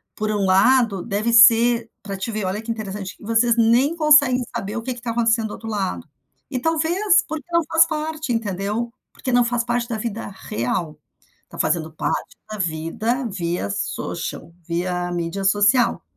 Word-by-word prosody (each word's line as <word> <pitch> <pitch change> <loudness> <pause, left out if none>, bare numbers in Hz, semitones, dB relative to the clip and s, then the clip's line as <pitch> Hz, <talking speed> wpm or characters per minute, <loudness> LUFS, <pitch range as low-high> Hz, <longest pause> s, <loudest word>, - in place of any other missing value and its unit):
por 215 0 -2
um 205 -2 0
lado, 200 +1 +3
deve 215 +2 -1
ser 230 0 +6
para 200 -1 -5
te 195 - -4
ver. 215 -2 -3
Olha 190 +3 -2
que 230 +1 -4
interessante, 205 -4 -5
que - - -18
vocês 230 +2 +2
nem 240 +7 +3
conseguem 290 -6 +5
saber 200 +2 -4
o - - -3
que 255 +2 -3
que 245 - -11
está 235 0 -4
acontecendo 230 -1 +1
do - - -9
outro 225 - -8
lado, 200 -4 -3 0.4
e 255 - -1
talvez 330 +7 +2
porque 310 -1 -5
não 335 0 +3
faz 320 - +5
parte, 310 -3 -3
entendeu, 215 +1 -2 0.2
porque 260 - -4
não 245 0 +4
faz 235 0 0
parte 240 0 -1
da 225 - -2
vida 225 0 -4
real. 155 - -4 0.5
Tá - - -11
fazendo 160 0 0
parte - - -3
da 215 - -6
vida 190 - -2
via 175 - -3
social 100 +10 -4
via 175 +1 -2
mídia 175 +3 -3
social. 205 +5 +3
225 Hz, 180 wpm, -21 LUFS, 195-245 Hz, 0.5 s, ser